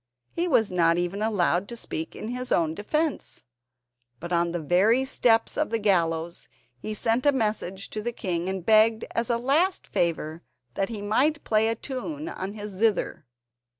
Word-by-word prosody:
He 345 +1 -1
was 240 - +3
not 170 -2 +3
even 175 +3 -2
allowed 200 -3 +1
to 235 - -6
speak 160 -7 -5
in 215 - -6
his 250 +1 -4
own 160 -2 +2
defence, 300 - -2 0.8
but 175 +3 -5
on 170 0 +2
the 175 - -2
very 200 - +3
steps 230 -3 +2
of 305 - 0
the 230 - 0
gallows 170 -5 0 0.3
he 215 +10 -5
sent 230 +3 0
a 285 - +5
message 210 -6 -2
to 215 - -4
the 240 +3 -2
king 180 -6 -3
and 190 -2 -4
begged, 220 0 +4
as 230 0 -1
a 235 - +2
last 300 +10 +1
favour, 165 -1 -1 0.3
that 195 +7 -1
he 215 -3 -5
might 285 +9 +1
play 220 0 +2
a 225 - 0
tune 290 +6 -5
on 195 - -5
his 210 -1 -6
zither. 200 - 0
215 Hz, 180 wpm, -26 LUFS, 175-240 Hz, 0.8 s, a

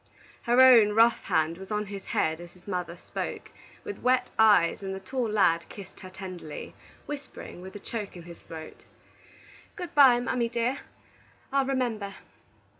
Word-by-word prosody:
Her 240 +1 +2
own 235 -5 +8
rough 230 +2 +4
hand 165 -1 0
was 190 - -10
on 210 0 -1
his 200 -1 -8
head 160 +1 0
as 175 0 -12
his 180 +1 -22
mother 180 -3 -3
spoke, - - -6 0.3
with 415 - -7
wet 250 0 +2
eyes, 205 -7 +5
and 190 -1 -4
the - - -6
tall 240 +4 -3
lad 175 -6 +2
kissed 195 -2 -11
her 185 - -10
tenderly, 185 -5 -8 0.3
whispering, 285 -10 -8
with 190 +1 -10
a - - -6
choke 205 -2 -6
in 175 - -10
his 170 0 -12
throat: 160 -1 -10 0.9
"Good 360 -4 -7
by, 265 -4 +7
mammy 245 -1 -1
dear; 240 +3 -1 0.7
I'll 275 -1 +3
remember." 230 -7 -2
205 Hz, 165 wpm, -27 LUFS, 180-245 Hz, 0.9 s, own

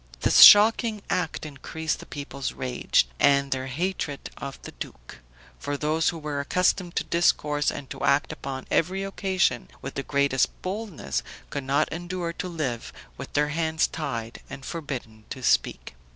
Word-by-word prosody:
This - - +4
shocking 215 0 +8
act 165 -3 -1
increased 155 +2 -4
the - - -11
people's 140 -2 -5
rage, 125 - +1
and 140 -1 +4
their 130 0 -1
hatred 145 0 -3
of 140 -1 -7
the - - -8
duke; - - -10 0.4
for 145 0 -3
those 155 +2 +1
who 170 - -4
were 150 -2 -4
accustomed 180 +4 +1
to - - +1
discourse 150 -3 +2
and 135 - -6
to - - -6
act 140 +1 +2
upon 135 -1 -6
every 190 +4 +1
occasion 190 -9 0
with 135 - -7
the 140 - -3
greatest 140 -2 +1
boldness, 185 - -3 0.3
could 135 - -4
not 140 +2 +2
endure 175 0 -4
to 185 - -5
live 145 -9 -3 0.2
with - - -9
their 150 0 +2
hands 160 +1 +1
tied 115 -7 -5
and 135 - -8
forbidden 125 -9 -6
to 130 -2 -7
speak. - - +1
150 Hz, 160 wpm, -26 LUFS, 135-175 Hz, 0.4 s, shocking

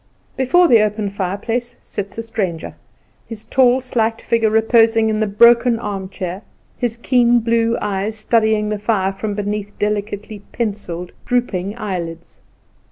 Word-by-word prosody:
Before 305 +8 +4
the 230 -7 +6
open 210 -1 -1
fireplace 205 +6 -3
sits 200 0 -7
a 230 - -3
stranger, 190 -8 -3 0.5
his 225 -2 -8
tall, 260 -1 +3
slight 225 -3 -1
figure 230 -1 +1
reposing 225 0 +3
in 215 -1 0
the 215 - +1
broken 235 +3 +5
armchair, 190 -3 -5 0.3
his 240 -2 -2
keen 240 0 +3
blue 230 0 +1
eyes 205 +1 -2
studying 220 -1 +1
the 210 -1 -2
fire 200 -3 0
from 205 +1 -4
beneath 205 0 -4
delicately 210 0 -3
pencilled, 200 -6 -4 0.2
drooping 215 -5 -1
eyelids. 170 -6 -6
215 Hz, 135 wpm, -19 LUFS, 200-230 Hz, 0.5 s, the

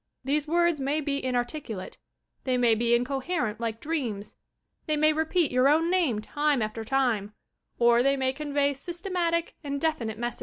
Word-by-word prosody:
These 290 +3 0
words 340 -2 +2
may 280 +3 0
be 280 -2 -2
inarticulate, 245 -5 -3 0.4
they 255 -1 0
may 240 -2 +4
be 235 +1 +2
incoherent 255 -2 -1
like 225 -1 -3
dreams, 240 -11 -3 0.5
they 305 -1 +1
may 310 +1 +4
repeat 320 +1 +1
your 255 +2 +4
own 325 +3 +3
name 315 - +1
time 290 +1 0
after 215 +1 -4
time, 220 -5 0 0.4
or 235 0 +5
they 275 +2 +2
may 260 0 0
convey 285 0 0
systematic 340 +2 -2
and 280 -1 -3
definite 240 -9 -1
messages. 240 +1 -4
275 Hz, 160 wpm, -27 LUFS, 235-310 Hz, 0.5 s, or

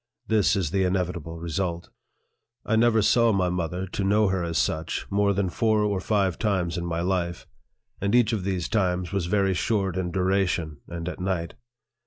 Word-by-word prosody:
This 105 -9 +3
is 90 -6 -1
the 95 0 +1
inevitable 90 -3 -2
result. 85 +1 -3 0.7
I 110 - +1
never 115 -1 +4
saw 115 +1 +4
my 95 -3 +1
mother, 90 +1 -2
to 95 +1 -4
know 105 +1 +3
her 95 -2 0
as 85 -1 -2
such, 80 +6 -1
more 100 0 +2
than 100 -1 0
four 110 +3 +1
or 100 -2 0
five 95 -3 0
times 95 -6 0
in 85 -1 -3
my 85 0 -2
life; 85 -1 -1 0.6
and 100 +3 +1
each 120 -2 +4
of 105 -4 -1
these 95 -3 -1
times 90 -4 0
was 95 -4 -1
very 95 0 +2
short 95 0 0
in 90 -1 -1
duration, 90 -4 0
and 85 0 -6
at 90 - -5
night. 90 -3 -2
95 Hz, 185 wpm, -25 LUFS, 85-100 Hz, 0.7 s, never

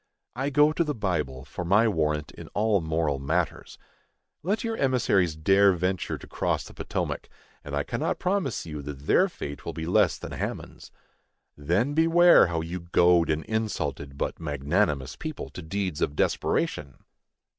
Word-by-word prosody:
I 135 +3 -1
go 150 +2 +4
to 170 - +1
the 150 -3 -3
Bible 75 - -2
for 75 +5 -6
my 100 +6 +4
warrant 75 -6 0
in - - -11
all 105 -2 +2
moral 80 -3 -1
matters. 80 +3 -2 0.6
Let 200 +6 -1
your 225 -1 -2
emissaries 110 - +2
dare 95 +5 +4
venture 90 +1 -2
to - - -12
cross - - -1
the - - -12
Potomac, - - -4 0.3
and 70 0 -5
I 70 - 0
cannot - - -2
promise 180 - -1
you 75 -3 -6
that 70 -1 -7
their - - +4
fate 70 0 -7
will - - -5
be 80 - -5
less 95 0 +3
than - - -8
Haman's. - - -6 0.6
Then 90 - 0
beware 165 - +6
how 85 -1 -2
you 85 +3 -5
goad 85 0 +3
an 80 0 0
insulted 105 -10 -3
but - - -3
magnanimous 75 -1 0
people 155 -3 -6
to - - -8
deeds 90 -1 -3
of 70 - 0
desperation! 70 -2 -1
90 Hz, 165 wpm, -26 LUFS, 75-110 Hz, 0.6 s, beware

